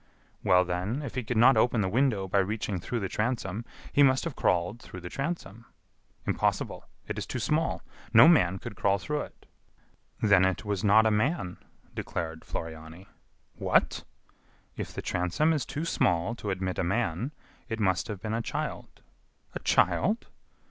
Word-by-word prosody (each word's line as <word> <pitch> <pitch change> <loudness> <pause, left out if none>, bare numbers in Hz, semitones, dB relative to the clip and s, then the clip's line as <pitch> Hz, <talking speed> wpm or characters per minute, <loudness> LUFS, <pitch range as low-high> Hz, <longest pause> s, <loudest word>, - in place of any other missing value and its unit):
"Well, 90 0 +5
then, 90 +10 -2
if 135 - -6
he 130 - -2
could 115 +1 -2
not 125 +4 +7
open 115 0 +3
the 95 - +1
window 110 -3 +1
by 100 +2 +2
reaching 100 -1 -1
through 115 +7 -3
the 95 - -1
transom, 110 -1 -2 0.3
he 145 - +4
must 130 -2 +5
have 165 -5 -4
crawled 90 +6 0
through 90 - -10
the 90 - -7
transom." 135 - -4 0.6
"Impossible; - - -1 0.2
it - - -3
is - - -5
too - - -3
small. 160 +2 0 0.3
No 115 +4 +9
man 95 - +5
could 100 - -8
crawl 100 0 +2
through 150 +9 -2
it." - - -11 0.7
"Then 100 -4 +5
it 95 +2 0
was 100 -3 -2
not 110 +2 +6
a 110 - +4
man," 105 - 0 0.4
declared 80 -1 -4
Floriani. 80 +3 -7 0.4
"What!" - - +1 0.7
"If - - -5
the - - -6
transom 90 - +1
is 145 -5 -2
too 150 +3 -3
small 90 - +1
to 110 -3 -6
admit 95 -1 -2
a - - +1
man, 100 - -1 0.4
it 115 -1 -3
must 95 -4 +1
have 105 -3 -5
been 110 0 -2
a 115 - 0
child." - - -5 0.5
"A - - -4
child!" 215 +6 +2
105 Hz, 170 wpm, -28 LUFS, 95-125 Hz, 0.7 s, No